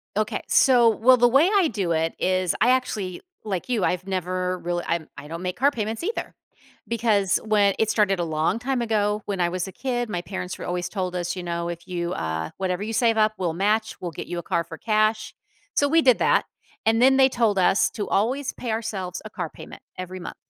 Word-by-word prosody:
Okay. 215 0 -1
So, 245 -3 +5
well, 250 +4 +5
the 245 - +5
way 275 +9 +4
I 380 -5 +4
do 195 - -2
it 165 0 0
is 185 -1 +1
I 240 - +5
actually, 215 -8 -1 0.2
like 195 -2 -3
you, 235 -6 0
I've 180 0 0
never 185 -1 -2
real 175 0 -2
I'm 170 -2 -1
I 140 - -9
don't 165 +2 -6
make 180 0 -3
car 280 +3 +3
payments 225 +2 -4
either 445 +6 -3 0.5
because 215 -5 +2
whe 205 -2 +3
it 220 - +2
started 195 -3 +2
a 175 - +1
long 160 +5 0
time 260 0 -1
ago 210 -2 0
when 200 -2 -3
I 175 -1 +2
was 180 +1 -3
a - - -7
kid, 245 0 -3
my 175 -4 -2
parents 180 0 -5
were - - -7
always 180 0 -2
told 185 -3 -3
us, 175 0 -2
you 180 - -5
know, 170 0 -3
"If 170 0 -7
you, 175 -1 -3
uh 80 0 -3
whatever 185 0 -2
you 220 - -4
save 225 -1 +2
up 215 0 +3
we'll 175 -3 -1
match, 215 +5 0
we'll 175 - -4
get 150 - -7
you 175 0 -4
a - - -7
car 170 - 0
for 165 0 -10
cash." 215 +1 +1 0.4
So, 285 - +3
we 325 +3 +4
did 255 -4 +5
that - - +3 0.4
and, 225 +1 +3
then, 265 +1 +6
they 265 0 +6
told 230 -5 +1
us 190 +2 +3
to 210 - -4
always 255 +7 0
pay 240 - -5
ourselves 200 -5 -3
a - - -6
car - - -5
payment - - -12 0.2
every 185 0 -6
month 175 - -7
200 Hz, 230 wpm, -24 LUFS, 180-230 Hz, 0.5 s, then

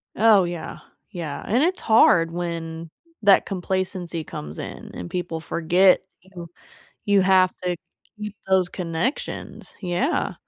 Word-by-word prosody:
Oh, 215 -2 +5
yeah. 175 -2 -5 0.3
Yeah. 165 -7 -5
And 245 +7 +2
it's 365 +3 0
hard 170 -7 +5
when 165 -1 -5 0.3
that 200 -1 +6
complacency 185 -2 -3
comes 75 - -8
in - - -8
and 90 - -7
people 175 -2 -3
forget 175 +3 +3 0.2
you 180 -2 -10 0.6
you 205 -1 +4
have 185 -1 +4
to 180 -1 0 0.4
keep 210 0 -6
those 190 -2 +3
connections. 175 - -4
Yeah. 185 - 0
180 Hz, 125 wpm, -23 LUFS, 170-195 Hz, 0.6 s, that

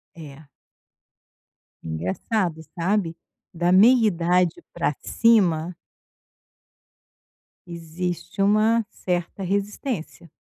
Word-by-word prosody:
É. 150 -2 -12 1.4
Engraçado 155 - -2 0.2
sabe, 175 -1 0 0.4
da 175 +1 0
meia 230 +5 +6
idade 175 -2 +1
pra 170 -3 -1
cima. 180 -7 +2 1.9
Existe 170 +3 -5
uma 215 +3 +3
certa 180 0 -4
resistência. 200 - -4
180 Hz, 70 wpm, -23 LUFS, 165-205 Hz, 1.9 s, meia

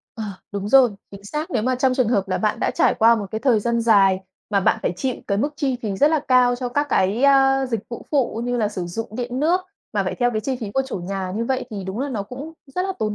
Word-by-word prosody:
Ờ, 220 - -4 0.3
đúng 200 0 -3
rồi, 260 -1 +6 0.2
chính 200 0 -12
xác, 300 +9 -4
nếu 225 -4 0
mà 255 +1 +1
trong 255 0 +2
trường 255 -4 +2
hợp 200 -5 +1
là 185 - 0
bạn 215 -1 0
đã - - +1
trải - - +3
qua 230 +1 +5
một 205 -3 -3
cái 220 - -2
thời 235 -4 +2
gian 235 +2 0
dài 195 -4 +4 0.3
mà 200 - +2
bạn - - +2
phải - - 0
chịu 255 +5 -1
cái 200 -1 0
mức 285 +6 0
chi 270 -5 0
phí 200 -3 -2
rất 290 - +5
là 315 - +3
cao 250 -1 +4
cho 250 -1 -3
các 290 +4 0
cái, 200 +6 +1
ơ, 270 -1 +4
dịch 230 -5 -2
vụ 235 - -7
phụ 255 -6 0
như 245 0 -1
là 215 -3 +1
sử 185 -4 -5
dụng 225 +7 -5
điện 245 +1 -3
nước 345 +5 +3 0.3
mà 205 -2 +1
phải 185 - -2
theo 245 -1 +1
cái 215 -2 -2
chi 260 +2 -2
phí 210 -3 -4
của 270 - +2
chủ 265 - -4
nhà 185 +1 -4
như 230 - -1
vậy 260 +1 -1
thì 200 -3 -5
đúng 190 +3 -5
là 285 - -1
nó 220 -6 -3
cũng 265 +10 -8 0.2
rất 365 - 0
là 385 - -2
tốn 215 -1 -1
235 Hz, 290 wpm, -22 LUFS, 205-265 Hz, 0.3 s, rồi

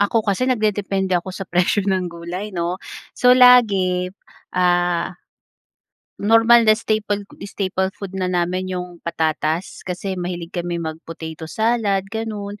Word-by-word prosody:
Ako 215 +2 +2
kasi 215 +6 0
nagdedepende 200 -5 0
ako 180 +1 0
sa 195 - -5
presyo 180 +2 +1
ng 185 -2 0
gulay 170 +4 -6
'no. 175 -1 -3 0.3
So, 250 0 +5
lagi, 200 -8 +5 0.5
ah, 175 -1 +2 1.1
normal 225 +2 +5
na 215 - +7
staple 215 -2 -1 0.2
staple 190 -1 -1
food 195 -2 -7
na 185 -1 -2
namin 180 +1 -1
'yong 180 -1 -7
patatas. 160 +1 -2
Kasi 185 +1 -4
mahilig 175 -1 -5
kaming 175 -1 -3
mag-potato 160 0 -7
salad, 220 -2 +1
gano'n, 210 -2 -5
185 Hz, 130 wpm, -21 LUFS, 175-210 Hz, 1.1 s, na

